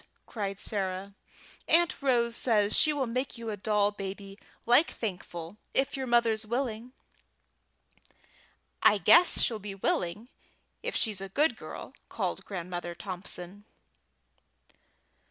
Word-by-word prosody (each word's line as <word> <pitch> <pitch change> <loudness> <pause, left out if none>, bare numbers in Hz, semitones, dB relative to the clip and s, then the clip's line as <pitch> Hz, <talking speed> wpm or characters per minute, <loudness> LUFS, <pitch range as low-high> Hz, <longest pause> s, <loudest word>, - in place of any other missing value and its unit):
cried 200 -3 -4
Sarah, 195 -1 -3 0.5
"Aunt 340 -2 +3
Rose 235 -4 +2
says 215 -4 +2
she 310 - +4
will 285 -3 0
make 255 +3 -3
you 230 -1 -5
a - - -3
doll 205 0 +1
baby 195 0 -7 0.3
like 245 +7 +5
Thankful, 180 -3 -6 0.2
if 275 +1 +2
your 265 -1 -3
mother's 235 -2 +3
willing!" 235 +1 -3 1.9
"I 210 - +6
guess 345 - +6
she'll 225 -3 +1
be 200 -1 -7
willing 195 +4 -2 0.5
if - - -3
she's 210 -4 +1
a 195 - -6
good 300 - +2
girl," - - -9 0.2
called - - -3
Grandmother 175 -2 -5
Thompson. 185 +1 -6
210 Hz, 120 wpm, -29 LUFS, 195-240 Hz, 1.9 s, I